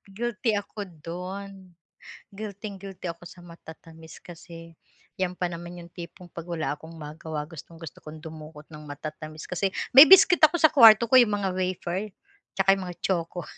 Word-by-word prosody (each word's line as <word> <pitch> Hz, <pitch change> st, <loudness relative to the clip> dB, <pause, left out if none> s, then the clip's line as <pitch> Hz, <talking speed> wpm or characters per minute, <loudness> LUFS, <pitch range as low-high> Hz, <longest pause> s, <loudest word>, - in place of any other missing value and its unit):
Guilty 235 Hz, 0 st, -1 dB
ako 205 Hz, 0 st, -5 dB, 0.2 s
dun. 185 Hz, +2 st, -8 dB, 0.6 s
Guilting 200 Hz, -1 st, -8 dB
guilty 190 Hz, -2 st, -8 dB
ako 170 Hz, +1 st, -11 dB
sa 175 Hz, -, -15 dB
matatamis, 160 Hz, -1 st, -14 dB
kasi 165 Hz, -1 st, -12 dB, 0.5 s
yan 180 Hz, -1 st, -2 dB
pa 180 Hz, -1 st, -2 dB
naman 175 Hz, +1 st, -8 dB
yung 170 Hz, -, -14 dB
tipong 175 Hz, +1 st, -11 dB
pag 170 Hz, 0 st, -9 dB
wala 165 Hz, -3 st, -2 dB
akong 160 Hz, +3 st, -11 dB
magawa 155 Hz, 0 st, -7 dB
gustong-gusto 165 Hz, 0 st, -12 dB
kong 155 Hz, 0 st, -11 dB
dumukot 155 Hz, -1 st, -11 dB
ng 150 Hz, -, -10 dB
matatamis. 155 Hz, +1 st, -8 dB
Kasi 190 Hz, +2 st, -2 dB, 0.2 s
may 275 Hz, +4 st, +10 dB
biskwit 365 Hz, -2 st, +7 dB
ako 330 Hz, +3 st, -3 dB
sa 315 Hz, -2 st, +4 dB
kwarto 225 Hz, -3 st, +8 dB
ko, 260 Hz, -, +8 dB
yung 210 Hz, -4 st, +2 dB
mga 195 Hz, -2 st, -2 dB
wafer, 185 Hz, +1 st, -3 dB, 0.5 s
tsaka 195 Hz, 0 st, +4 dB
yung 195 Hz, -1 st, -1 dB
mga 175 Hz, -, -8 dB
choco, 175 Hz, -2 st, -2 dB
175 Hz, 165 wpm, -25 LUFS, 165-200 Hz, 0.6 s, may